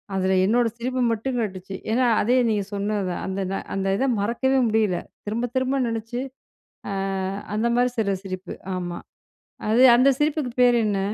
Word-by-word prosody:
அதில 190 Hz, 0 st, +1 dB
என்னோட 235 Hz, +3 st, +3 dB
சிரிப்பு 255 Hz, +2 st, -2 dB
மட்டும் 245 Hz, +3 st, -2 dB
கேட்டுச்சு. 190 Hz, -3 st, -4 dB, 0.2 s
ஏன்னா 250 Hz, +2 st, +3 dB, 0.2 s
அதே 245 Hz, +4 st, +2 dB
நீங்க 205 Hz, -2 st, +1 dB
சொன்னது 205 Hz, 0 st, -1 dB
தான். -, -, -4 dB
அந்த 190 Hz, +1 st, -3 dB, 0.4 s
அந்த 195 Hz, 0 st, -2 dB
இத 270 Hz, -, +1 dB
மறக்கவே 260 Hz, +5 st, +1 dB
முடியல. 215 Hz, -5 st, +1 dB, 0.3 s
திரும்ப 230 Hz, +4 st, -1 dB
திரும்ப 260 Hz, +1 st, +1 dB
நெனைச்சு, 230 Hz, +2 st, -3 dB, 0.7 s
அ -, -, -3 dB, 0.6 s
அந்த 225 Hz, +3 st, +1 dB
மாரி 245 Hz, 0 st, +2 dB
சில 200 Hz, -3 st, +1 dB
சிரிப்பு. 185 Hz, -1 st, -6 dB, 0.2 s
ஆமா. 175 Hz, -1 st, -4 dB, 0.7 s
அது, 235 Hz, +3 st, +4 dB
அந்த 255 Hz, +3 st, +5 dB
சிரிப்புக்கு 295 Hz, -4 st, 0 dB
பேர் 245 Hz, -1 st, +6 dB
என்ன? 200 Hz, -2 st, 0 dB
225 Hz, 155 wpm, -24 LUFS, 195-250 Hz, 0.7 s, பேர்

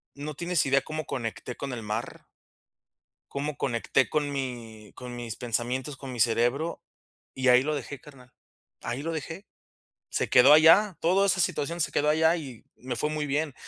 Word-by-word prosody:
no 145 Hz, +2 st, -6 dB
tienes 175 Hz, +1 st, 0 dB
idea 140 Hz, 0 st, +3 dB
cómo 155 Hz, 0 st, -5 dB
conecté 120 Hz, -1 st, -5 dB
con 140 Hz, -, -5 dB
el 115 Hz, -2 st, -6 dB
mar. 105 Hz, +3 st, -5 dB, 1.1 s
Cómo 145 Hz, +1 st, -3 dB
conecté 130 Hz, 0 st, 0 dB
con 145 Hz, -1 st, -1 dB
mi 115 Hz, -6 st, -6 dB
con 125 Hz, -1 st, -8 dB
mis 120 Hz, -2 st, -6 dB
pensamientos, 125 Hz, +4 st, -3 dB
con 130 Hz, -1 st, -8 dB
mi 125 Hz, -, -7 dB
cerebro, 120 Hz, +8 st, +1 dB, 0.5 s
y 130 Hz, 0 st, 0 dB
ahí 125 Hz, 0 st, +6 dB
lo 155 Hz, +1 st, -1 dB
dejé 140 Hz, 0 st, -6 dB
carnal, 125 Hz, -3 st, -16 dB, 0.5 s
ahí 120 Hz, +4 st, -4 dB
lo 165 Hz, -, -3 dB
dejé. 165 Hz, +4 st, -6 dB, 0.6 s
Se -, -, -1 dB
quedó 130 Hz, +4 st, +7 dB
allá 165 Hz, +5 st, +6 dB
toda 190 Hz, +4 st, +3 dB
esa 190 Hz, -1 st, +2 dB
situación, 170 Hz, +1 st, -1 dB
se 155 Hz, -, 0 dB
quedó 150 Hz, -, 0 dB
allá 160 Hz, +2 st, +3 dB
y 135 Hz, -8 st, -9 dB
me 125 Hz, 0 st, -5 dB
fue 150 Hz, +6 st, -1 dB
muy 155 Hz, -1 st, -2 dB
bien, 145 Hz, 0 st, -1 dB
140 Hz, 175 wpm, -27 LUFS, 125-155 Hz, 1.1 s, quedó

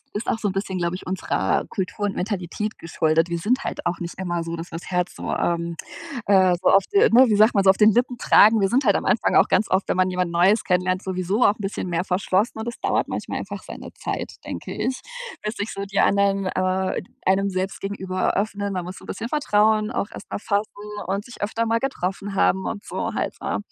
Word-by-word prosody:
ist 210 Hz, -, -4 dB
auch 225 Hz, -, +1 dB
so 210 Hz, -, -1 dB
'n -, -, -2 dB
bisschen, 195 Hz, -1 st, -3 dB
glaube 170 Hz, 0 st, -1 dB
ich, 185 Hz, -, -8 dB
unserer 180 Hz, -, 0 dB
Kultur 195 Hz, +2 st, -3 dB
und 200 Hz, -, -1 dB
Mentalität 205 Hz, +2 st, -3 dB
geschuldet. 165 Hz, 0 st, +1 dB
Wir 170 Hz, 0 st, -2 dB
sind 250 Hz, +9 st, 0 dB
halt -, -, -4 dB
auch 175 Hz, -, 0 dB
nicht 175 Hz, 0 st, -5 dB
immer 175 Hz, -2 st, -2 dB
so, 165 Hz, 0 st, -4 dB
dass 165 Hz, +2 st, -7 dB
wir 165 Hz, -, -5 dB
das 175 Hz, -, -11 dB
Herz 180 Hz, -1 st, -1 dB
so, -, -, -5 dB
ähm, 170 Hz, -1 st, -1 dB, 0.5 s
äh, 190 Hz, -3 st, +5 dB
so -, -, +2 dB
auf 195 Hz, 0 st, +5 dB
d 405 Hz, -, +5 dB
ne, 255 Hz, +3 st, +7 dB
wie 210 Hz, -, +3 dB
sagt 215 Hz, +2 st, +5 dB
man 195 Hz, -1 st, +3 dB
so 190 Hz, -, +8 dB
auf 190 Hz, -, +3 dB
den 215 Hz, 0 st, +6 dB
Lippen 245 Hz, +1 st, +1 dB
tragen. 215 Hz, 0 st, +6 dB
Wir 195 Hz, -, +3 dB
sind 260 Hz, +5 st, +2 dB
halt 205 Hz, -, +4 dB
am -, -, -3 dB
Anfang 220 Hz, -, +2 dB
auch -, -, +6 dB
ganz 215 Hz, -, +2 dB
oft, 190 Hz, +1 st, +1 dB
wenn -, -, +1 dB
man 185 Hz, 0 st, +2 dB
jemand 180 Hz, -1 st, -1 dB
Neues 185 Hz, +6 st, +3 dB
kennenlernt, 185 Hz, +1 st, +1 dB
sowieso 190 Hz, +4 st, -1 dB
auch 205 Hz, -, +5 dB
'n 220 Hz, -, -20 dB
bisschen 195 Hz, -2 st, -3 dB
mehr 175 Hz, +1 st, -1 dB
verschlossen 190 Hz, +4 st, 0 dB
und 220 Hz, -, -5 dB
das 235 Hz, -, -5 dB
dauert -, -, 0 dB
manchmal -, -, -4 dB
einfach -, -, -6 dB
seine -, -, -9 dB
Zeit, -, -, -4 dB
denke -, -, -6 dB
ich, 255 Hz, 0 st, -2 dB, 0.4 s
bis 215 Hz, +2 st, -3 dB
sich 205 Hz, +2 st, -3 dB
so 200 Hz, -, -4 dB
die 200 Hz, 0 st, -1 dB
anderen, 195 Hz, -1 st, +2 dB
äh, 185 Hz, 0 st, 0 dB, 0.3 s
einem 195 Hz, +1 st, +2 dB
selbst 190 Hz, +1 st, -3 dB
gegenüber 190 Hz, -2 st, -2 dB
öffnen. 200 Hz, 0 st, -1 dB
Man 180 Hz, -2 st, -3 dB
muss 185 Hz, +2 st, -8 dB
so -, -, -14 dB
'n -, -, -13 dB
bisschen 225 Hz, +4 st, -5 dB
Vertrauen 215 Hz, -6 st, +2 dB
auch 205 Hz, -, -2 dB
erstmal -, -, -6 dB
fassen 205 Hz, 0 st, 0 dB, 0.4 s
und 195 Hz, +2 st, -2 dB
sich 240 Hz, -, -13 dB
öfter 230 Hz, +2 st, -1 dB
mal 230 Hz, +1 st, +2 dB
getroffen 195 Hz, -6 st, -3 dB
haben 190 Hz, 0 st, +2 dB
und 205 Hz, -2 st, -4 dB
so -, -, -4 dB
halt, -, -, -2 dB
ne? -, -, -1 dB
195 Hz, 240 wpm, -23 LUFS, 185-210 Hz, 0.5 s, so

